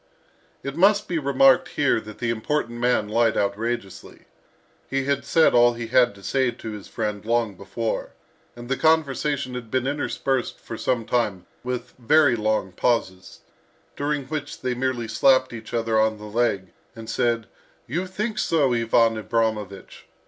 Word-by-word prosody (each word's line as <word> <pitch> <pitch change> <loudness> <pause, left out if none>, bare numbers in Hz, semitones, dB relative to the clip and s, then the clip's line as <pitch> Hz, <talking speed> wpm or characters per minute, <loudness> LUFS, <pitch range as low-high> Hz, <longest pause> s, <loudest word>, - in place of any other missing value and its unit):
It 140 0 -5
must 200 +4 +4
be 170 -2 -1
remarked 135 -2 +4
here 140 -6 +1
that 110 0 -11
the 120 -1 -1
important 120 +1 -2
man 120 -3 +1
lied 115 +1 +2
outrageously. 100 0 -3 0.6
He 135 0 0
had 140 0 0
said 165 -1 +4
all 120 0 +5
he 120 0 -5
had 120 -3 +4
to 100 - -16
say 130 +1 +1
to 115 -2 -7
his 105 -2 -8
friend 105 -2 -3
long 115 -1 0
before, 110 +4 -4 0.5
and 120 0 -10
the 135 +1 -1
conversation 145 -4 +1
had 125 -3 -6
been 130 +2 0
interspersed 135 -2 -2
for 115 - -8
some 120 0 -1
time 105 -7 -1 0.2
with 125 0 -4
very 140 +2 +4
long 110 -3 0
pauses, 95 -3 -1 0.5
during 145 0 -1
which 145 0 -5
they 130 -1 -1
merely 125 -2 -2
slapped 130 +2 +3
each 115 -1 -9
other 115 -1 +1
on 110 0 +2
the 105 - -12
leg, 105 -4 -1 0.2
and 115 -1 -9
said, 115 0 0 0.4
"You 175 +9 -3
think 210 +4 -3
so, 145 -6 +2
Ivan 115 -1 +3
Abramovich!" 105 -2 -3
120 Hz, 160 wpm, -24 LUFS, 110-135 Hz, 0.6 s, all